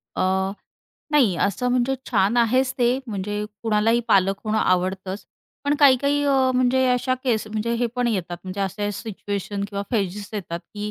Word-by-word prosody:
अ, 190 +1 +1 0.6
नाही, 235 -12 +4
असं 205 +5 0
म्हणजे 250 +1 +1 0.2
छान 210 0 +2
आहेच 255 +3 +3
ते, 245 +1 +3
म्हणजे 205 0 -3 0.2
कुणालाही 225 +1 +2
पालक 195 0 +3
होणं 215 0 0
आवडतंच, 185 +1 0 0.4
पण 290 +1 +2
काही-काही 285 +1 +4
अ, 270 -2 +3
म्हणजे 255 +1 +3
अशा 250 +1 +1
केस 220 -4 +1
म्हणजे 220 +2 -2
हे 240 +1 +1
पण 245 -1 +1
येतात. 180 -5 -2
म्हणजे 190 +2 -5
असे 205 +2 -2
सिच्युएशन 200 -1 -4
किंवा 200 -1 -3
फेजेस 205 -2 -2
येतात, 175 -5 -4
की 210 +3 -7
215 Hz, 160 wpm, -23 LUFS, 195-250 Hz, 0.6 s, नाही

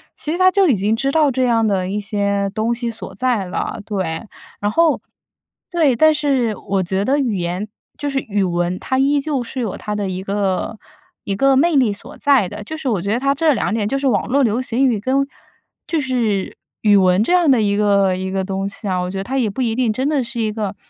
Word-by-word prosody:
其 305 - -4
实 340 - -1
他 370 0 +6
就 385 -2 +3
已 245 - +3
经 205 +4 +1
知 270 +4 0
道 305 -1 +3
这 260 0 0
样 230 -3 +2
的 190 -3 0
一 205 +2 -2
些 200 -1 -1
东 220 +3 0
西 235 0 -3
所 230 0 -7
在 250 -5 0
了， 185 +2 -4
对。 190 -3 -3 0.4
然 205 0 0
后 330 +3 +2 0.7
对， 320 -6 +3
但 310 +6 +5
是 265 -7 0
我 195 0 -2
觉 190 +2 -1
得 275 +7 +1
语 245 -7 0
言 180 +3 -3 0.3
就 290 - -3
是 275 -1 0
语 205 -5 -1
文， 175 0 -1
它 260 - -2
依 280 +2 +3
旧 280 -3 -2
是 240 +3 -6
有 225 -6 -2
它 210 - -5
的 205 -1 -2
一 185 0 -3
个 200 +2 -1 0.5
一 200 - -1
个 275 +6 +3
魅 320 +4 +3
力 255 -6 +4
所 235 +8 -8
在 275 -9 +3
的， 210 - -8
就 315 +9 -6
是 310 -3 -5
我 215 -8 0
觉 200 - -2
得 235 - +1
它 275 +1 +2
这 305 +2 +2
两 210 - -1
点， 215 -2 0
就 275 - -1
是 275 - -3
网 230 -6 +1
络 275 +2 +2
流 230 +1 +1
行 255 +1 +1
语 230 -5 +1
跟 260 +6 -1 0.7
就 330 - 0
是 235 -8 -1 0.3
语 210 -2 +5
文 185 0 +4
这 350 - +1
样 350 -4 +4
的 260 -3 +5
一 200 -1 +1
个 200 -2 +3
一 190 +1 -4
个 190 0 -1
东 195 0 -3
西 205 +1 -6
啊， 185 -1 0
我 180 - -3
觉 195 - -5
得 195 - -2
它 265 +6 -3
也 230 -4 +1
不 230 +6 -4
一 230 -2 0
定 245 -2 +1
真 255 +6 -1
的 290 -3 +1
是 240 0 -5
一 220 -1 0
个 210 -2 -4
225 Hz, 265 characters per minute, -19 LUFS, 200-270 Hz, 0.7 s, 他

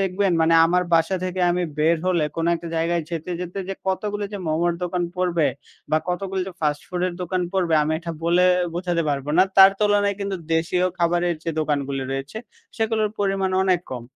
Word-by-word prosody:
দেখবেন, 195 0 +1
মানে 160 +1 +4
আমার 180 +1 +2
বাসা 165 +3 +2
থেকে 185 0 -3
আমি 180 +1 0 0.2
বের 160 +2 +3
হলে 175 -4 +2
কোনো 165 +1 0
একটা 170 0 -6
জায়গায় 165 +1 0
যেতে, 165 +1 -4
যেতে 180 +2 -5
যে 195 - -3
কতগুলি 205 +2 -1
যে 205 - -4
মোমোর 170 +2 +1
দোকান 180 0 -1
পড়বে, 175 -4 +1 0.4
বা 155 - +3
কতগুলি 190 +1 -2
যে - - -8
ফাস্ট 150 -1 0
ফুড 180 -1 -3
এর 180 - -3
দোকান 185 +1 -1
পড়বে 180 -4 +1
আমি 155 +1 -1
এটা, 170 0 -6
বলে 175 +2 +3 0.3
বোঝাতে 175 -1 -1
পারবো 140 0 -2
না। 185 - +8
তার 195 0 +9
তুলনায় 205 -1 +2
কিন্তু 200 -1 -2 0.2
দেশীয় 175 +3 +1
খাবারের 175 0 +1
যে 165 - -1
দোকানগুলি 140 -3 -1
রয়েছে, 135 +9 -5 0.4
সেগুলোর 220 -1 0
পরিমাণ 195 -1 0
অনেক 185 -2 +2
কম। 125 -2 -5
175 Hz, 190 wpm, -23 LUFS, 165-190 Hz, 0.4 s, তার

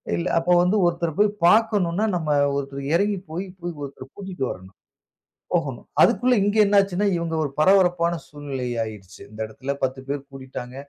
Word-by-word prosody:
இல்ல 170 +1 -2
அப்போ 175 +2 -1
வந்து 195 +4 +2
ஒருத்தர 170 -1 0
போய் 210 0 +5 0.2
பாக்கணும்னா, 210 -2 +3
நம்ம 160 -3 -2 0.3
ஒருத்தர் 140 0 -5
இறங்கி 200 +3 +2
போயி 185 +4 -4
கு 175 - -5 0.2
ஒருத்தர 135 -2 -8
கூட்டிட்டு 190 -9 -4
வரணும். 95 +1 -11 0.8
போகணும். - - -1 0.2
அதக்குள்ள 250 +1 +4
இங்கு 205 +2 +1
என்ன 205 0 +1
ஆச்சுனா, 195 +1 -1
இவங்க 170 -1 -3
ஒரு 145 - -3
பரபரப்பான 175 -1 +3
சூழ்நிலை 140 -4 -5 0.2
ஆகிடிச்சு. 105 -3 -10
இந்த 110 +1 -14
இடத்தில 130 +5 -5
10 130 0 -1
பேர் 145 0 -2
கூடிட்டாங்க. 130 -2 -8
170 Hz, 160 wpm, -23 LUFS, 135-195 Hz, 0.8 s, போய்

